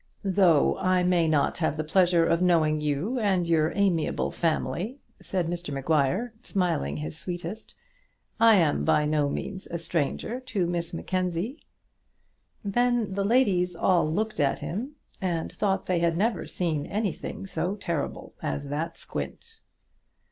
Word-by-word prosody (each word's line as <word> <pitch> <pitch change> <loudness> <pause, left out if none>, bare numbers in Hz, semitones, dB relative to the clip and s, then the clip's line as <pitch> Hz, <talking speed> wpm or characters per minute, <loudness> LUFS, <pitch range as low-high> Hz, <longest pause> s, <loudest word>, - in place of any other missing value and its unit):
"Though 185 -6 +4
I 185 -1 +2
may 175 -2 +3
not 155 0 +1
have 160 -2 0
the 155 - -1
pleasure 175 +1 +3
of 170 +1 +2
knowing 160 -4 +3
you 150 - -1
and 190 -5 +2
your 160 -2 +2
amiable 190 -5 +1
family," 170 - -1 0.2
said 185 -3 -1
Mr 175 -2 -3
Maguire, 155 - +1
smiling 170 - -1
his 75 +1 -5
sweetest, 175 +3 -6 0.6
"I 225 -1 +7
am 160 - +2
by 150 - +3
no 150 -1 +1
means 190 +6 -5
a 170 - -3
stranger 170 - -2
to 230 -8 -1
Miss 170 -1 -2
Mackenzie." 185 - -2 1.0
Then 240 0 +1
the 200 +1 0
ladies 195 -6 +2
all 170 -2 +2
looked 215 +4 -1
at 140 -2 +2
him, 250 - -5 0.3
and 170 -4 -1
thought 195 -2 0
they 180 -2 +1
had 170 -1 +1
never 225 +5 0
seen 160 -5 -2
anything 205 -2 -3
so 190 0 -2
terrible 170 -7 -4
as 140 -1 -3
that 150 +4 -3
squint. 460 -2 -7
175 Hz, 145 wpm, -27 LUFS, 160-200 Hz, 1.0 s, I